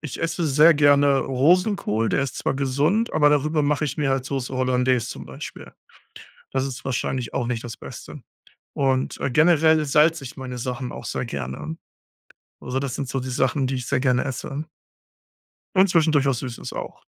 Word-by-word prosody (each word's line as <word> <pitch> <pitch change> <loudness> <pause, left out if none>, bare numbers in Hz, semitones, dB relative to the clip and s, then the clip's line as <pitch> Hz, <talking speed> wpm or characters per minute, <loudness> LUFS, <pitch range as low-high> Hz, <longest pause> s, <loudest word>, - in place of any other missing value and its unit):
ich 150 -5 -7
esse 165 0 -1
sehr 150 +4 +6
gerne 145 -1 +4
Rosenkohl, 140 - +2
der - - +1
ist 135 - -4
zwar - - -1
gesund, 145 - +1
aber 150 -1 +4
darüber 150 +1 +1
mache 150 +1 +1
ich 145 - -3
mir 145 -2 +1
halt 135 -1 0
Soße 135 -2 -4
Hollandaise 125 -2 +1
zum - - -8
Beispiel. - - -9 0.8
Das 135 0 0
ist 135 0 -7
wahrscheinlich 130 -2 -2
auch 120 - -1
nicht 120 -1 -3
das 120 - -7
Beste - - -10 0.5
und 130 -1 0
äh, 140 - -1
generell 160 +1 +4
salze 150 +1 +3
ich 125 - -9
meine 125 -1 -6
Sachen 125 +1 -4
auch - - -8
sehr - - -3
gerne. 70 - -5 0.8
Also 125 +1 -3
das 135 -3 -3
sind 135 -3 -4
so 135 - -2
die 130 0 -5
Sachen, 130 +1 +1
die 130 0 -2
ich 125 -2 -5
sehr 140 - 0
gerne 125 -2 +2
esse. 140 +3 -4 1.1
Und 190 +1 +5
zwischendurch 155 -5 +3
was 130 -3 +1
Süßes 125 -2 -6
auch. - - -7
135 Hz, 180 wpm, -23 LUFS, 125-150 Hz, 1.1 s, sehr